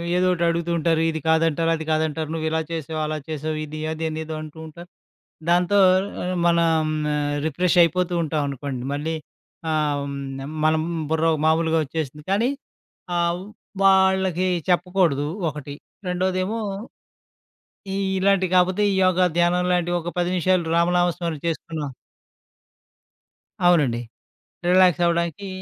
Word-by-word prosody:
ఏదోకటి 180 -1 +2
అడుగుతూంటారు. 170 -1 0
ఇది 160 - -4
కాదంటారు, 165 0 +2
అది 160 -1 -6
కాదంటారు. 155 0 -1
నువ్విలా 160 0 -1
"చేసావు, 160 -1 -4
అలా 155 0 -2
చేసావు. 155 0 -3
ఇది, 155 +1 -7
అదనేదో" 160 0 -4
అంటూంటారు. 160 +2 -10 0.6
దాంతో 180 +3 +3 0.5
ఆహ్ 180 +1 -2
మనం 170 -1 +3 0.8
రిఫ్రెషయిపోతూంటాం 170 0 +2
అనుకోండి. 135 -2 -5
మళ్ళి 155 +3 -2 0.6
ఆహ్, 150 -2 0 0.6
మనం 155 0 +3 0.3
బుర్ర 160 0 +2 0.2
మామూలుగా 160 +1 +2
ఒచ్చేసింది. 150 0 -5
కానీ, 220 +6 +2 0.7
ఆహ్, 170 +1 0 0.4
వాళ్ళకి 190 -2 +3 0.2
చెప్పకూడదు, 175 -5 +2 0.2
ఒకటి. 145 -1 -7 0.3
రెండోదేమో, 185 +4 -1 1.4
ఈ - - -1 0.2
ఇలాంటివి 190 -1 +2
కాపోతే, 185 +3 +3
ఈ - - 0
యోగా, 185 0 +3
ధ్యానం 175 +1 +2
లాంటివి 175 0 +1
ఒక 175 +1 -5
10 175 0 0
నిమిషాలు, 185 0 +2
రామనామ 175 +1 +3
స్మర 170 -2 -2
చేసుకున్నా 160 -2 -4 1.8
అవునండి. 150 -10 +4 0.7
రిలాక్సవ్వడానికి 175 0 +3
170 Hz, 105 wpm, -23 LUFS, 155-180 Hz, 1.8 s, అవునండి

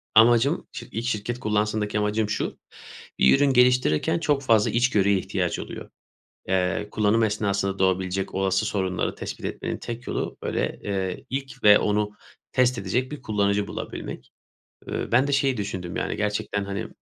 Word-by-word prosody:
Amacım 120 +7 +5
şi - - -8
ilk 115 +2 -3
şirket 120 +1 -2
kullansında 105 0 0
ki 105 0 -1
amacım 105 0 0
şu, - - -2 0.6
bir 65 - +6
ürün 140 -1 +3
geliştirirken 125 - +3
çok 145 -3 +1
fazla 110 -4 +3
içgörüye 105 -5 +3
ihtiyaç 95 - -2
oluyor. - - -7 0.6
Eee, 95 +2 0
kullanım 110 +2 +2
esnasında 100 -2 0
doğabilecek 95 0 0
olası 95 +1 +1
sorunları 95 -3 -1
tespit - - -6
etmenin - - -3
tek 120 +1 -7
yolu - - -3
böyle, - - -2
eee, 95 -2 -3
ilk 135 0 -5
ve 105 0 +8
onu 105 0 0 0.4
test 125 -1 +3
edecek 120 +7 -1
bir 150 -3 -7
kullanıcı 100 -2 0
bulabilmek. - - -7 0.6
Iıı, - - -3
ben 130 +3 +5
de 145 - -2
şeyi 135 -2 +2
düşündüm 95 -4 -4
yani - - -2
gerçekten, 105 -1 -1
hani, 100 +2 -4
105 Hz, 155 wpm, -25 LUFS, 100-120 Hz, 0.6 s, ve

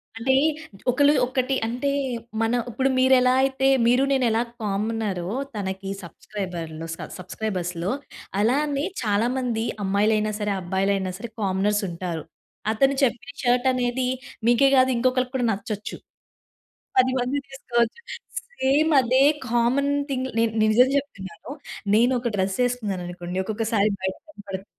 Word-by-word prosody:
అంటే 240 +4 +1 0.6
ఒకలు 285 +3 +4
ఒకటి 255 +1 0
అంటే, 250 +4 -1 0.5
మన 225 +1 +1 0.2
ఇప్పుడు 265 +3 0
మీరు 260 +1 +5
ఎలా 250 0 +4
అయితే 270 0 +1 0.2
మీరు 250 +3 +4
నేను 265 -2 +2
ఎలా 225 +1 +2 0.2
కామనరో 205 -3 -2 0.3
తనకి 195 -1 -4
సబ్‌స్క్రైబర్‌‌లో 170 -3 -6
స - - -8 0.2
సబ్‌స్క్రైబర్స్‌లో 180 -2 -3 0.5
అలానే 280 +6 +1 0.2
చాలా 210 +1 +2
మంది 235 -3 -1 0.2
అమ్మాయిలైనా 210 +2 +2
సరే, 210 -1 -1
అబ్బాయిలైనా 190 +1 0
సరే, 235 +3 -7
కామనర్స్ 200 +2 +1
ఉంటారు. 170 -2 -4 0.5
అతను 270 +5 +3
చెప్పిన 250 +2 0
షర్ట్ 245 +1 +3
అనేది 250 0 0 0.4
మీకే 240 +3 +5
కాదు 260 0 +5
ఇంకొకరికి 255 +1 +1
కూడా 245 -2 +1
నచ్చొచ్చు. 205 +1 -4 1.0
10 255 0 +5
మంది 250 +3 -1
తీసుకోవచ్చు. 240 - -1 0.6
సేమ్ 290 +4 +3
అదే 255 +2 +3 0.3
కామన్ 245 +4 +2 0.2
థింగ్‌ 260 -1 -1
నె - - +4 0.2
నిజం 220 +4 +5
చెప్తున్నాను, 200 -5 -6 0.4
నేను 240 +3 +4
ఒక 240 0 -1
డ్రెస్ 190 0 0
వేసుకున్నాననుకోండి 185 -7 -3
ఒక్కొక్కసారి 215 0 +1
బయట 190 0 -2
కనపడుతుంది. 200 -8 -8
225 Hz, 125 wpm, -24 LUFS, 195-255 Hz, 1.0 s, మీరు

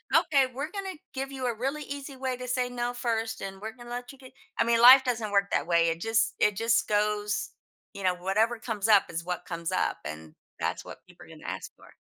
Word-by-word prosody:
"Okay, 275 -3 +4
we're 280 +5 -4
gonna 390 -2 -5 0.2
give 270 0 -4
you 260 -2 -3
a 240 - 0
really 275 +6 -2
easy 280 0 -7
way 260 -1 -3
to 250 0 -7
say 250 0 0
no 245 0 -2
first, 225 -2 -2
and 195 0 -6
we're 220 +1 -5
gonna 240 -1 -12
let 245 0 -5
you 275 - -15
get" 260 -1 -14 0.3
I - - +5
mean, 235 0 +2
life 260 +2 +10
doesn't 230 -5 -2
work 200 0 +2
that - - 0
way; 170 -1 +4
it 165 0 -2
just 225 +2 +1
it 210 -1 +3
just 230 +3 +2
goes 210 0 0 0.4
you 200 - -8
know, 185 -1 +3
whatever 210 +6 0
comes 220 -2 -2
up 210 -3 +5
is 165 0 -4
what 180 0 -4
comes 170 -1 -4
up, - - 0
and 75 +1 -8 0.2
that's - - -2
what - - -10
people - - -15
are - - -18
gonna - - -13
ask - - -5
for. - - -18
230 Hz, 240 wpm, -28 LUFS, 200-255 Hz, 0.4 s, life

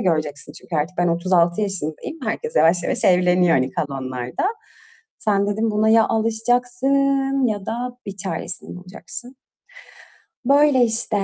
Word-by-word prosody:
göreceksin 155 -7 -1
çünkü 170 - -6
artık 160 +5 -2
ben 175 0 +2
36 170 +1 +2
yaşındayım, 195 - -4
herkes 470 0 -3
yavaş 170 +1 +4
yavaş - - -1
evleniyor, 180 -1 +4
hani, 130 0 0
kalanlarda. 130 - -4 0.7
Sen 205 -5 +1
dedim 215 +2 0
buna 215 +1 +1
ya 225 0 +5
alışacaksın 250 +4 +1
ya 205 -4 -3
da 245 +2 -4
bir 200 -1 -6
çaresini 185 -2 -5
bulacaksın. 210 +8 -10 1.1
Böyle, 280 -1 +5
işte. 225 -1 -1
205 Hz, 130 wpm, -21 LUFS, 175-245 Hz, 1.1 s, ya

